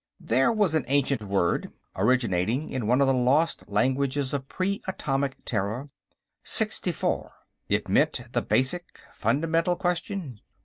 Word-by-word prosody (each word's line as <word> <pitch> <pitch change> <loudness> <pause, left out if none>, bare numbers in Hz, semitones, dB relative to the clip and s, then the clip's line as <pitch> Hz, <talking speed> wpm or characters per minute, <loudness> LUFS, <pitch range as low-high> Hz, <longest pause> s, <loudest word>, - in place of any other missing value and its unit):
There 130 - +2
was 210 -7 +2
an 160 - +2
ancient 140 -2 +1
word, 95 -4 0 0.2
originating 115 - +1
in 120 -5 -2
one 125 +4 +3
of 140 - +4
the 135 - +4
lost 130 +6 +1
languages 130 +6 0
of 135 -2 -3
Pre 195 +5 -2
Atomic 135 -7 -1
Terra 110 +6 -2 0.5
sixtifor. - - +1 0.4
It - - 0
meant, - - +2
the - - +1
basic, 135 +8 -1 0.2
fundamental, 165 +4 +1
question. 175 - -3
135 Hz, 130 wpm, -26 LUFS, 125-160 Hz, 0.5 s, of